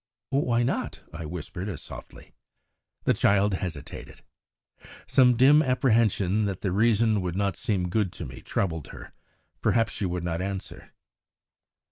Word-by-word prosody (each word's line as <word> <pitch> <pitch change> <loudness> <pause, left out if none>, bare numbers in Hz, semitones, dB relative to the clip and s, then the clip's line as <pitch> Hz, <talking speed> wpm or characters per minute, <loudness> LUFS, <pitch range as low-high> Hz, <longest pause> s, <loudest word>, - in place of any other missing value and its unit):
"Why 120 -4 +2
not?" 120 - -2
I 80 +1 -6
whispered 90 +4 -6
as 90 - -6
softly. - - -11 0.7
The - - +3
child 100 0 +3
hesitated. 85 -6 -6 0.8
Some 125 -2 +4
dim 140 +5 +7
apprehension 110 - +2
that 95 -3 -3
the 95 - -1
reason 110 +1 +3
would 90 -1 -3
not 100 0 0
seem 100 -7 -1
good 95 0 0
to 85 - -6
me 65 -2 -9
troubled 80 -6 -2
her, - - -11 0.5
perhaps, 115 -1 +2
for - - -7
she 100 - 0
would 90 0 -3
not 85 0 -2
answer. 95 0 -6
100 Hz, 145 wpm, -26 LUFS, 90-115 Hz, 0.8 s, dim